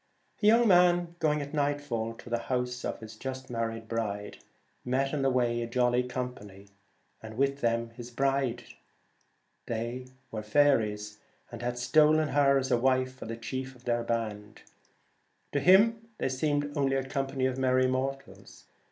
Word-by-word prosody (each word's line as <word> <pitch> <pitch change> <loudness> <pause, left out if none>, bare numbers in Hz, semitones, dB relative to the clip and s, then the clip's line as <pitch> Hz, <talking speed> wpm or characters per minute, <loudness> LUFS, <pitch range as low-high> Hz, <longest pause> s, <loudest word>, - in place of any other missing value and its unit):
A 210 - +3
young 230 +2 +6
man 175 -2 +4
going 150 -2 +1
at 145 +2 -10
nightfall 145 -6 -1
to - - -14
the 120 - +1
house 125 -1 -1
of - - -4
his 110 0 -9
just 130 +2 -6
married 115 -1 -3
bride, 105 -3 -3 0.4
met 135 +3 0
in 145 - 0
the 135 - +3
way 120 -2 +1
a 115 - -3
jolly 125 +1 +2
company, 125 -6 -6 0.5
and 110 0 -9
with 140 +1 +1
them 115 0 0
his 120 +1 -9
bride. 135 -1 0 1.0
They 120 +3 -4 0.2
were 110 - -4
faeries, 105 -4 +1 0.3
and 120 -1 -8
had 120 0 -2
stolen 155 +4 +4
her 140 -1 +4
as 135 0 -1
a 120 - +4
wife 130 +1 +1
for 130 - -9
the 115 0 -5
chief 130 +3 -5
of 125 - -19
their 120 -1 +1
band. 110 -3 -4 0.9
To 145 - +1
him 220 +7 +5
they - - -1
seemed 145 +2 -1
only 135 -1 +1
a 135 - 0
company 135 -1 -1
of 130 0 -1
merry 130 0 +3
mortals. 135 +2 -4
130 Hz, 165 wpm, -29 LUFS, 115-140 Hz, 1.0 s, young